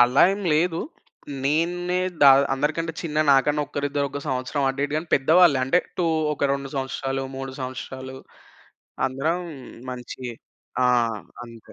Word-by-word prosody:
అలా 125 +3 +6
ఏం 200 - -4
లేదు. 165 +2 +1 0.6
నేన్నే 175 +4 0 0.2
ద - - +7 0.3
అందరికంటే 155 +4 -1
చిన్న! 150 -3 -4 0.2
నాకన్నా 145 +2 +3
ఒక్కరిద్దరు 145 0 -2
ఒక 145 - -5
సంవత్సరం 130 +2 -1
అటు 135 +1 -3
ఇటు 145 - -3
గాని, 160 +2 -3
పెద్దవాళ్ళే 160 +1 +5
అంటే 135 +7 +3 0.2
2 175 - +2 0.3
ఒక - - -8
2 140 0 -3
సంవత్సరాలు, 135 0 -2
3 135 0 -5
సంవత్సరాలు 130 0 -6 0.9
అందరం 150 +7 -1 0.5
మంచి 125 +1 -8 0.6
ఆ! - - +5 0.6
అంతే. 115 -2 -14
140 Hz, 135 wpm, -24 LUFS, 135-165 Hz, 0.9 s, ద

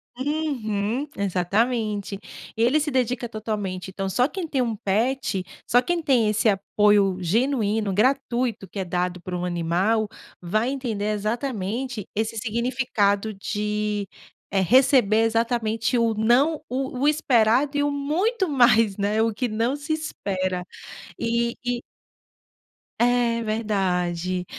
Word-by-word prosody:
Uhum, 260 -4 -2
exatamente. 200 +2 0 0.4
Ele 240 +7 +3
se 300 0 -1
dedica 250 -1 0
totalmente. 205 -5 -4
Então, 195 +1 -4
só 250 +6 +2
quem 350 +1 -5
tem 270 -4 0
um 230 -2 -1
pet, 215 0 0 0.2
só 245 +2 +5
quem 340 +5 -1
tem 245 -7 +3
esse 215 +2 +1
apoio 200 -1 +3
genuíno, 215 +1 +1
gratuito 240 -1 0
que 195 - -11
é 190 - -2
dado 180 +1 -2
por 185 - -7
um 180 0 -2
animal, 180 +6 +1 0.3
vai 215 +7 0
entender 240 -7 -3
exatamente 225 +1 -3
esse 220 +1 -1
significado 225 -3 0
de, 210 0 -2 0.4
eh, 195 - +2
receber 225 - +4
exatamente 225 0 0
o 230 -1 +2
não 245 +9 +2
o 260 0 -3
o 285 - +2
esperado 275 -2 +3
e 290 - +2
o 290 - +1
muito 350 - 0
mais, 235 -7 +4
né, 205 +2 0
o 225 0 +1
que 245 +4 -1
não 230 +4 0
se 290 +2 -3
espera. 185 - -3 0.6
E 235 +1 0
e 245 -1 -2 1.2
É, 240 -1 +2
verdade. 185 -5 -1
225 Hz, 130 wpm, -24 LUFS, 200-255 Hz, 1.2 s, só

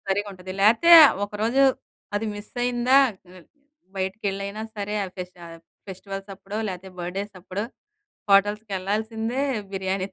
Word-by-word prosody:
సరిగ్గా 205 +1 0
ఉంటది. 185 0 -9
లేతే 230 +12 +5 0.3
ఒకరోజు 220 +6 0 0.5
అది 220 +2 -2
మిస్ 205 +1 -10
అయిందా, 245 +2 +2 0.4
ఆ! 185 - -13 0.6
బైటకెళ్ళైయిన 195 +1 -3 0.2
సరే 205 +1 -3 0.2
ఫెస్ట్ 180 0 -7
ఆహ్, 165 0 -11 0.3
ఫెస్టివల్స్ 195 +1 -7
అప్పుడో 200 +2 -6
లేతే 185 +1 -7
బర్త్‌డేస్ 195 +3 -5
అప్పుడో 195 +4 -4 0.7
హోటల్స్‌కి 205 +1 +3
వెళ్ళాల్సిందే 220 +6 -2 0.3
బిర్యానీ 190 0 -2
200 Hz, 120 wpm, -24 LUFS, 190-220 Hz, 0.7 s, లేతే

